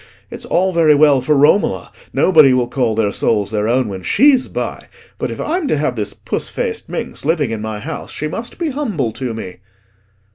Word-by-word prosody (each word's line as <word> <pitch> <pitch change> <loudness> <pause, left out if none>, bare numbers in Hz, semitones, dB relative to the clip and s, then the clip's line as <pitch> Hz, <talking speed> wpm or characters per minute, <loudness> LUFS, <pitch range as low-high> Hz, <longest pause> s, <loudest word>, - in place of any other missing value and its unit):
It's - - -7
all 185 +1 +1
very 160 -3 +4
well 145 -2 +4
for 150 +4 +1
Romola;—nobody 150 -2 +3
will 125 -1 +1
call 120 -3 -1
their 105 -2 +1
souls 105 -1 0
their 105 -1 -1
own 125 +1 +1
when 95 -2 -6
she's 265 - +3
by; - - -5 0.3
but - - -2
if - - -7
I'm 330 -1 -1
to 155 - +1
have 140 -4 -1
this 105 -2 -3
puss - - -4
faced - - -3
minx - - -5
living 150 -5 0
in 110 -1 -4
my 110 -1 -4
house 155 +9 -6
she 155 - -3
must 225 +10 -6
be 335 -4 -2
humble 210 - -2
to 120 0 -5
me." 95 -5 -7
135 Hz, 195 wpm, -17 LUFS, 110-170 Hz, 0.3 s, very